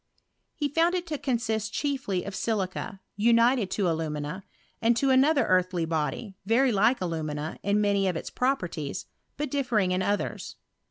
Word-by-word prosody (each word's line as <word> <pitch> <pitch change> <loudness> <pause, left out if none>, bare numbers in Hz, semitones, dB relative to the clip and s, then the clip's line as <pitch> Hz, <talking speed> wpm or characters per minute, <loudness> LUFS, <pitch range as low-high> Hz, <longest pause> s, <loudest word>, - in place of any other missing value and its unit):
He 295 - 0
found 330 +5 +2
it 355 -1 -2
ta 315 -3 -3
consist 225 -5 -1
chiefly 265 -11 -1
of 200 - -6
silica, 195 0 -2 0.2
united 230 0 +4
to 195 -1 0
alumina, 160 +2 -2 0.4
and 230 +1 +3
to 270 +1 +2
another 275 0 +4
earthy 185 -2 +2
body, 160 +6 -2
very 240 +6 +3
like 220 +5 +3
alumina 155 -3 -3
in 200 +1 +1
many 200 -1 +2
of 180 - 0
its - - -5
properties, 180 - -2 0.3
but 295 -2 -3
differing 240 -10 +1
in 185 +1 +1
others. 205 +2 -2
210 Hz, 155 wpm, -27 LUFS, 185-255 Hz, 0.4 s, united